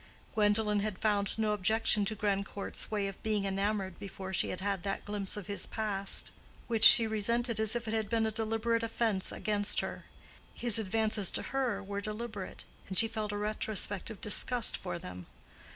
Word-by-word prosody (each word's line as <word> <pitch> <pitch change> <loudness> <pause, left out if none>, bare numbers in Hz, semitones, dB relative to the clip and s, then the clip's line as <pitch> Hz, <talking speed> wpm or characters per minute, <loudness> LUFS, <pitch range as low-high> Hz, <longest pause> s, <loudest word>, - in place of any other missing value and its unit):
Gwendolen 210 0 +2
had 205 -2 -3
found 205 -1 -1
no 215 -1 0
objection 210 +1 +2
to 215 +2 -1
Grandcourt's 200 -1 -3
way 210 -2 -2
of 195 - -9
being 210 -2 -1
enamored 195 -1 -2
before 190 -1 -8
she - - +1
had 185 - -5
had 195 -1 -2
that 195 0 -4
glimpse 205 -1 -3
of 205 - -7
his 200 +2 -2
past, 200 -3 -1 0.3
which 225 -2 -1
she 230 -1 +10
resented 230 +2 0
as 220 +1 +2
if 235 -1 -4
it 220 - -3
had 220 -2 -2
been 225 -1 +1
a 220 - -1
deliberate 225 +1 -1
offense 225 -4 -1
against 205 -1 -1
her. - - -7 0.5
His 235 -2 +4
advances 215 -1 +1
to - - -1
her 245 -7 -1
were 200 +1 -5
deliberate, 215 -1 -6 0.2
and 190 - -3
she 225 - +9
felt 215 -1 -4
a 205 - -4
retrospective 210 0 -2
disgust 235 +3 +3
for 175 -2 -5
them. 90 - -10
210 Hz, 180 wpm, -31 LUFS, 200-220 Hz, 0.5 s, she